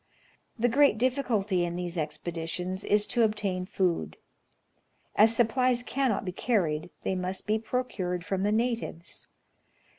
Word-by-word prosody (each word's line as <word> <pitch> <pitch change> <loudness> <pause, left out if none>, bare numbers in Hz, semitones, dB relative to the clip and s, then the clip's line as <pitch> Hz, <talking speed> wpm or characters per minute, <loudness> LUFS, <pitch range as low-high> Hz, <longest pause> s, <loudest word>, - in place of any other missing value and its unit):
The 240 +1 +2
great 275 -1 +4
difficulty 225 -7 +1
in 175 0 -2
these 175 0 -4
expeditions 170 +3 -3
is 210 0 +2
to 240 - 0
obtain 205 -4 0
food. 185 -4 -1 1.0
As 220 +2 +6
supplies 245 +1 +2
cannot 255 -6 0
be 180 - -2
carried, 175 -6 0
they - - 0
must 185 +1 -3
be 215 +1 +1
procured 190 -7 -2
from 195 -2 -1
the 205 +1 +1
natives. 230 -6 -2
205 Hz, 130 wpm, -28 LUFS, 180-235 Hz, 1.0 s, As